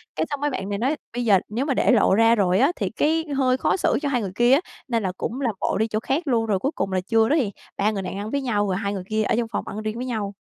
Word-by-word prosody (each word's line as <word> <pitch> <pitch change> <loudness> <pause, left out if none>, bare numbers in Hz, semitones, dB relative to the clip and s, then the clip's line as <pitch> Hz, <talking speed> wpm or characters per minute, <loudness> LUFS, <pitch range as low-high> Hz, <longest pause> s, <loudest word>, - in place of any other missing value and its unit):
cái - - 0
xong 285 -1 -4
mấy 295 - +1
bạn 195 -7 -4
này 200 - -2
nói, 265 +7 +1 0.2
bây 245 0 -2
giờ 200 -4 +5
nếu 240 +6 -2
mà 280 - +1
để - - +3
lộ 210 -5 +4
ra 225 +1 +5
rồi 190 -2 +2
á, 280 +6 +4
thì 195 -4 -2
cái 320 +7 +1
hơi 255 -1 +2
khó 320 - +1
xử - - +1
cho 285 - -1
hai 250 -4 0
người 195 -3 -4
kia 240 +3 +4
á, 285 - +5 0.3
nên 230 -4 0
là 185 - -1
cũng 255 +4 -4
làm 235 -6 0
bộ - - 0
đi 220 +1 +1
chỗ 215 0 -1
khác 285 +7 -2
luôn, 230 -3 +2
rồi 205 -4 0
cuối 275 +9 -1
cùng 195 - -2
là 185 -1 0
trưa 225 +3 +2
đó 300 - +3
thì 220 -8 -1 0.3
ba 205 +2 +2
người 200 -2 -3
nàng 190 +1 -5
ăn 205 +2 -5
với 280 - 0
nhau, 210 -6 0
rồi 190 - 0
hai 200 -1 -2
người 190 -2 -4
kia 215 0 +1
ở - - +1
trong 235 - 0
phòng - - -3
ăn 215 +2 -5
riêng 215 0 -3
với 250 - -4
nhau. 215 -5 -3
225 Hz, 335 wpm, -23 LUFS, 205-260 Hz, 0.3 s, giờ